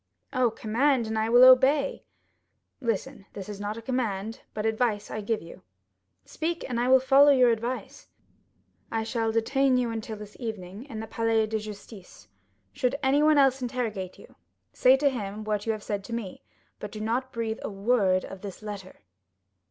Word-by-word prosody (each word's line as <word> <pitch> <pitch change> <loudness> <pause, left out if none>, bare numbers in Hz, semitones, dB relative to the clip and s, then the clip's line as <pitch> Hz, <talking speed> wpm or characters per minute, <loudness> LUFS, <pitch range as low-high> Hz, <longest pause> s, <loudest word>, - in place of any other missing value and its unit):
"Oh, 255 -3 +3
command, 240 +4 +1
and 220 0 -3
I 220 +1 0
will 245 +2 +7
obey." 270 +2 +5 0.7
"Listen; 225 -5 -3
this 195 -2 -7
is 205 -1 -7
not 205 +2 -4
a 230 - -8
command, 225 -2 -2
but 215 0 -3
advice 220 -2 0
I 215 - -4
give 215 -1 -2
you." 165 - -12 0.6
"Speak, 330 +2 -3
and 240 -2 -2
I 245 - +1
will 260 0 +7
follow 270 +2 +6
your 255 -4 +5
advice." 235 +3 -4 0.8
"I 225 -1 -1
shall 225 0 -1
detain 255 +4 +2
you 245 -2 0
until 220 -1 -5
this 210 0 -11
evening 215 -2 -6
in 225 -6 -7
the - - -5
Palais 225 0 +1
de 220 0 -2
Justice. 210 -2 -11 0.5
Should 250 +1 0
anyone 295 +3 +4
else 270 -1 +4
interrogate 230 -7 -3
you, - - -16 0.4
say 255 +1 +5
to 285 +1 +2
him 215 -5 -3
what 210 0 -2
you - - +3
have 215 -1 -5
said 205 -2 -3
to 235 - -7
me, 220 -6 -5 0.4
but 210 - -7
do 215 - -7
not 240 +4 -2
breathe 230 -2 -3
a - - -4
word 195 -2 +1
of 195 -1 -10
this 200 0 -8
letter." 200 -3 -8
225 Hz, 180 wpm, -27 LUFS, 210-255 Hz, 0.8 s, will